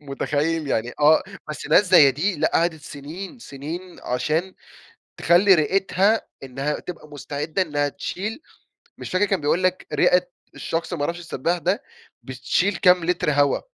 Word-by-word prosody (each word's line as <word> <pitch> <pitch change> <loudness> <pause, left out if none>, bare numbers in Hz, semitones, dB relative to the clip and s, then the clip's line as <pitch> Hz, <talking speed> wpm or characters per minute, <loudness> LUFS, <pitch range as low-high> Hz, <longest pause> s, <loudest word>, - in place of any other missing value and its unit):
متخيل؟ 150 +2 -2
يعني 120 -1 -1
آه، 155 +2 +5 0.3
بس 150 - -6
ناس 180 +7 +5
زي 150 -6 +8
دي، 175 +9 -1
لأ، - - +1
قَعَدِت 165 -2 +1
سنين 160 - -9
سنين 170 - -8
عشان 155 +9 -2 0.6
تخلي 190 +3 +5
رئتها 195 +6 +2 0.2
إنها 135 +3 -3
تبقى 165 -3 -9
مستعدة 150 +4 -3
إنها 145 -3 -1
تشيل 210 - -5 0.6
مش - - -7
فاكر 185 +3 +2
كان 195 -3 0
بيقول 150 +5 +1
لك 185 0 0
رئة - - +3 0.3
الشخص 165 +2 -4
ما 145 -4 -2
أعرفش 170 +3 -3
السباح 170 +1 -2
ده، 185 - -1 0.4
بتشيل 175 +9 -1
كام 180 -2 +4
لتر 175 -3 0
هوا، 145 0 +2
165 Hz, 150 wpm, -23 LUFS, 145-185 Hz, 0.6 s, زي